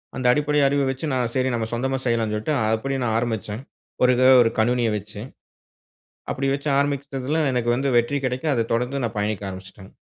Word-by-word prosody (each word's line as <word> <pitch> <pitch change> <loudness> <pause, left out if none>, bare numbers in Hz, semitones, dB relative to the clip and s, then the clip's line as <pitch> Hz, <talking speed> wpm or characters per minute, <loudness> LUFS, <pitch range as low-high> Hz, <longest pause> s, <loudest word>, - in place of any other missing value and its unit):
அந்த 130 - -4
அடிப்படை 150 +1 +1
அறிவ 140 +1 +1
வச்சு, 135 +4 -5
நான் 125 -2 0
சரி 130 0 +1
நம்ம 110 -1 -2
சொந்தமா 135 +3 -1
செய்யலாம்ன்னு 115 -3 0
சொல்லிட்டு, 145 +8 -1 0.2
அப்படி 135 +4 -2
நான் 110 - 0
ஆரம்பிச்சேன். 110 -1 -4 0.4
ஒரு 125 - +5
எதோ 130 +1 +5
1 115 - +1
கணினிய 120 +1 +2
வச்சு, 105 +1 -9 1.1
அப்படி 135 +1 -1
வச்சு 140 +2 -4
ஆரம்பிச்சதில 140 +1 -1
எனக்கு 120 -1 0
வந்து 135 +2 0
வெற்றி 130 +5 0
கிடைக்க, 130 +4 -3
அத 115 -2 0
தொடர்ந்து 125 +3 -1
நான் 115 -1 -4
பயணிக்க 105 -1 -2
ஆரம்பிச்சுட்டேங்க. 95 +1 -11
125 Hz, 180 wpm, -23 LUFS, 110-135 Hz, 1.1 s, ஒரு